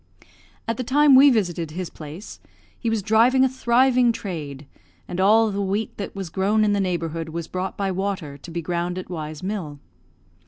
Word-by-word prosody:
At 230 Hz, -1 st, -1 dB
the 255 Hz, -, -2 dB
time 285 Hz, +3 st, +4 dB
we 270 Hz, +2 st, +8 dB
visited 175 Hz, -, 0 dB
his 175 Hz, +3 st, -5 dB
place, 155 Hz, +7 st, -10 dB, 0.4 s
he 230 Hz, -, -1 dB
was 225 Hz, -3 st, -1 dB
driving 235 Hz, +5 st, +4 dB
a -, -, +4 dB
thriving 250 Hz, -1 st, +3 dB
trade, 150 Hz, -10 st, -6 dB, 0.4 s
and 180 Hz, -, -5 dB
all 220 Hz, +3 st, +4 dB
the 200 Hz, 0 st, -2 dB
wheat 200 Hz, +3 st, -2 dB
that 200 Hz, -, -6 dB
was 190 Hz, -4 st, -6 dB
grown 205 Hz, +4 st, +2 dB
in 205 Hz, -, +2 dB
the 200 Hz, -, +1 dB
neighbourhood 165 Hz, -3 st, -2 dB
was 165 Hz, 0 st, -5 dB
brought 185 Hz, +1 st, -4 dB
by 195 Hz, -1 st, -1 dB
water 190 Hz, -6 st, -3 dB
to 145 Hz, -, -12 dB
be 170 Hz, 0 st, -4 dB
ground 175 Hz, +2 st, -2 dB
at 185 Hz, 0 st, -7 dB
Y 155 Hz, -3 st, -4 dB
's 155 Hz, +3 st, -11 dB
mill. 185 Hz, -7 st, -4 dB
195 Hz, 195 wpm, -23 LUFS, 170-225 Hz, 0.4 s, we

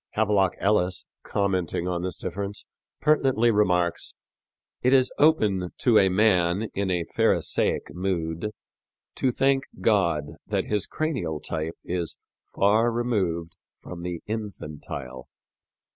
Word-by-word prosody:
Havelock 100 Hz, -3 st, +2 dB
Ellis, 95 Hz, -3 st, +1 dB, 0.2 s
commenting 95 Hz, -3 st, -1 dB
on 90 Hz, -1 st, -1 dB
this 90 Hz, -2 st, -3 dB
difference, 100 Hz, +3 st, -5 dB, 0.4 s
pertinently 135 Hz, -6 st, +3 dB
remarks, 90 Hz, -5 st, +1 dB, 0.7 s
"It 125 Hz, +2 st, +3 dB
is 130 Hz, -1 st, +4 dB
open 105 Hz, -, +3 dB
to 115 Hz, -4 st, +4 dB
a 95 Hz, -, +4 dB
man 95 Hz, 0 st, +2 dB
in 100 Hz, -1 st, -1 dB
a 90 Hz, -2 st, 0 dB
Pharisaic -, -, +1 dB
mood 85 Hz, 0 st, -2 dB, 0.6 s
to 130 Hz, -, +1 dB
thank 135 Hz, +2 st, +2 dB
God 85 Hz, -9 st, +2 dB, 0.2 s
that -, -, 0 dB
his 105 Hz, -2 st, -1 dB
cranial 125 Hz, -, -2 dB
type 80 Hz, +1 st, -4 dB
is 85 Hz, -2 st, -3 dB, 0.3 s
far 110 Hz, +4 st, +3 dB
removed 95 Hz, -9 st, -1 dB, 0.2 s
from 90 Hz, -1 st, -9 dB
the 90 Hz, -1 st, -5 dB
infantile. 75 Hz, -, -6 dB
95 Hz, 115 wpm, -26 LUFS, 85-110 Hz, 0.7 s, is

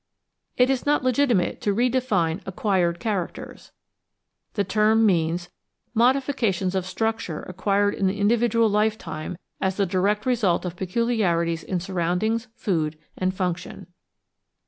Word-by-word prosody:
It 250 Hz, +1 st, +4 dB
is 265 Hz, -, -1 dB
not 295 Hz, -2 st, +2 dB
legitimate 255 Hz, -7 st, +1 dB
to 205 Hz, -, +1 dB
re 240 Hz, +5 st, +2 dB
define 210 Hz, -10 st, 0 dB
"acquired 185 Hz, -3 st, 0 dB
characters"; 200 Hz, -5 st, -4 dB, 0.8 s
the 205 Hz, -, +2 dB
term 215 Hz, +3 st, +3 dB
means 175 Hz, -2 st, +1 dB, 0.2 s
— -, -, -46 dB
^modifications 235 Hz, -6 st, +2 dB
of 190 Hz, -1 st, -1 dB
structure 220 Hz, -4 st, -2 dB
acquired 200 Hz, +2 st, 0 dB
in 195 Hz, -, 0 dB
the 190 Hz, +2 st, -1 dB
individual 230 Hz, +2 st, +3 dB
lifetime 205 Hz, -6 st, -1 dB, 0.2 s
as 190 Hz, 0 st, 0 dB
the 200 Hz, -, +2 dB
direct 200 Hz, +3 st, 0 dB
result 220 Hz, -9 st, +1 dB
of 180 Hz, -1 st, -4 dB
peculiarities 180 Hz, -5 st, 0 dB
in 185 Hz, -, -2 dB
siurroundings, 185 Hz, +6 st, -1 dB
food, 160 Hz, -5 st, -1 dB, 0.2 s
and 185 Hz, 0 st, 0 dB
function. 180 Hz, -2 st, -3 dB
200 Hz, 130 wpm, -24 LUFS, 180-225 Hz, 0.8 s, It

